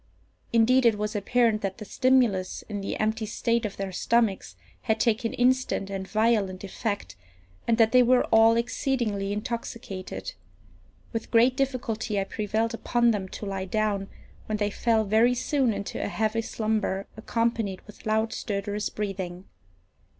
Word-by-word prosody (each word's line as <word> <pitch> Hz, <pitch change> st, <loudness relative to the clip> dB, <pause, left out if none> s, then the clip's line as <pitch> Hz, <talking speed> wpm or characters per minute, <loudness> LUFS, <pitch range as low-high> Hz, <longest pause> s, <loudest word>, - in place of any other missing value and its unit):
Indeed, 240 Hz, +2 st, +5 dB
it 220 Hz, -2 st, +3 dB
was 210 Hz, +1 st, -3 dB
apparent 220 Hz, +1 st, +2 dB
that 195 Hz, -1 st, -3 dB
the 210 Hz, -, -8 dB
stimulus, 240 Hz, -6 st, +2 dB
in 205 Hz, -2 st, -4 dB
the 195 Hz, -, -4 dB
empty 220 Hz, 0 st, 0 dB
state 230 Hz, +1 st, 0 dB
of 200 Hz, -, -11 dB
their 195 Hz, -1 st, -3 dB
stomachs, 225 Hz, +1 st, 0 dB, 0.3 s
had 220 Hz, -3 st, 0 dB
taken 230 Hz, -1 st, +1 dB
instant 250 Hz, -5 st, +1 dB
and 190 Hz, -1 st, -4 dB
violent 215 Hz, -4 st, +1 dB
effect, 200 Hz, +1 st, -4 dB, 0.5 s
and 230 Hz, -, +3 dB
that 225 Hz, -1 st, +4 dB
they 255 Hz, -, +6 dB
were 250 Hz, +1 st, +4 dB
all 225 Hz, +1 st, +6 dB
exceedingly 235 Hz, -5 st, -1 dB
intoxicated. 225 Hz, -, -5 dB, 0.8 s
With 225 Hz, -1 st, -4 dB
great 240 Hz, +2 st, +4 dB
difficulty 235 Hz, -6 st, -1 dB
I -, -, +1 dB
prevailed 220 Hz, +3 st, -1 dB
upon 235 Hz, +1 st, +2 dB
them 200 Hz, -3 st, -2 dB
to 210 Hz, -, -7 dB
lie 195 Hz, -1 st, -3 dB
down, 200 Hz, 0 st, -1 dB, 0.4 s
when 215 Hz, -, -1 dB
they 205 Hz, -1 st, 0 dB
fell 225 Hz, 0 st, +2 dB
very 220 Hz, +4 st, +3 dB
soon 265 Hz, -1 st, +1 dB
into 200 Hz, -1 st, -4 dB
a -, -, -1 dB
heavy 220 Hz, +2 st, 0 dB
slumber, 215 Hz, -3 st, -1 dB
accompanied 225 Hz, -3 st, -1 dB
with 210 Hz, -, -15 dB
loud 220 Hz, +1 st, +1 dB
stertorous 205 Hz, +1 st, -3 dB
breathing. 190 Hz, -3 st, -4 dB
220 Hz, 150 wpm, -26 LUFS, 200-235 Hz, 0.8 s, they